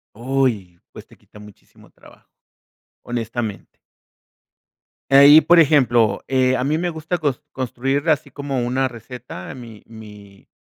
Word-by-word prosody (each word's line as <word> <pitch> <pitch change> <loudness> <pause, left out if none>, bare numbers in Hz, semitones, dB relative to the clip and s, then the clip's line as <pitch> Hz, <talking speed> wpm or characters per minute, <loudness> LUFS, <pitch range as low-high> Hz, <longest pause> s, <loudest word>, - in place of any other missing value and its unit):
Uy. 115 -8 -2
Pues - - -13
te - - -20
quita 105 - -19
muchísimo 105 -1 -18
trabajo. - - -21 0.7
Honestamente. 115 -4 -6 1.3
Ahí, 140 +3 +8
por 170 +2 +4
ejemplo, 120 -9 +3
eh, 130 -1 +1
a 125 - -2
mí 150 +3 0
me 175 +2 -2
gusta 160 +1 -4
cos 145 -6 -3
construir 135 +4 -3
así 145 -2 0
como 140 -1 -5
una 130 +2 -1
receta, 120 -5 -10
mi 115 -4 -12
mi 105 -3 -15
130 Hz, 130 wpm, -20 LUFS, 110-140 Hz, 1.3 s, Ahí